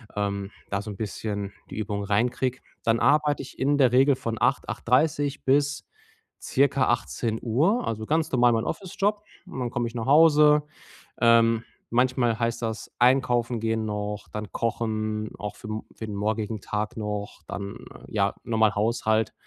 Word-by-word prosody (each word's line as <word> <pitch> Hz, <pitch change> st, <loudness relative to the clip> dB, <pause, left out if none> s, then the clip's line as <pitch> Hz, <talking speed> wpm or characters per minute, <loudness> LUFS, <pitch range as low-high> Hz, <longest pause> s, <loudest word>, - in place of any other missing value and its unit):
ähm, 100 Hz, -1 st, -2 dB, 0.2 s
da 100 Hz, 0 st, -1 dB
so 105 Hz, -, -7 dB
'n 100 Hz, -, -7 dB
bisschen 100 Hz, -1 st, -4 dB, 0.2 s
die -, -, -8 dB
Übung 105 Hz, -1 st, -2 dB
reinkriege. 125 Hz, +5 st, 0 dB, 0.2 s
Dann 115 Hz, 0 st, +2 dB
arbeite 150 Hz, +1 st, +3 dB
ich 135 Hz, -, -13 dB
in 140 Hz, +2 st, +2 dB
der 130 Hz, -4 st, +4 dB
Regel 135 Hz, +2 st, +5 dB
von 115 Hz, -3 st, -4 dB
8:00, -, -, +1 dB
8:30 145 Hz, +3 st, +1 dB
bis 140 Hz, +1 st, +1 dB, 0.6 s
circa 135 Hz, -1 st, +2 dB
18:00. 120 Hz, -, 0 dB
Also 110 Hz, -1 st, -3 dB
ganz 160 Hz, +4 st, 0 dB
normal 120 Hz, -2 st, +4 dB
mein 115 Hz, -, +1 dB
Office-Job 205 Hz, +2 st, -1 dB, 0.2 s
und 135 Hz, -, -8 dB
dann 125 Hz, -, -1 dB
komme 120 Hz, 0 st, -2 dB
ich 115 Hz, -, -8 dB
nach 115 Hz, -, -3 dB
Hause. 150 Hz, 0 st, +6 dB, 0.6 s
Ähm, 115 Hz, -1 st, +4 dB, 0.2 s
manchmal 120 Hz, -1 st, +2 dB
heißt 115 Hz, 0 st, -1 dB
das 115 Hz, -1 st, -4 dB
einkaufen 120 Hz, -2 st, +3 dB
gehen 110 Hz, 0 st, -1 dB
noch, 105 Hz, -1 st, -4 dB
dann 105 Hz, -2 st, -6 dB
kochen 110 Hz, -2 st, -2 dB
auch 105 Hz, 0 st, -6 dB
für 110 Hz, -, -10 dB
m 110 Hz, 0 st, -4 dB
für 110 Hz, -, -6 dB
den 105 Hz, -2 st, -6 dB
morgigen 110 Hz, +1 st, -2 dB
Tag 105 Hz, +2 st, -3 dB
noch, 105 Hz, -1 st, -4 dB
dann 100 Hz, 0 st, -5 dB, 0.3 s
ja, -, -, 0 dB
normal 110 Hz, -2 st, +2 dB
Haushalt, 110 Hz, 0 st, +1 dB
115 Hz, 160 wpm, -26 LUFS, 110-130 Hz, 0.6 s, Hause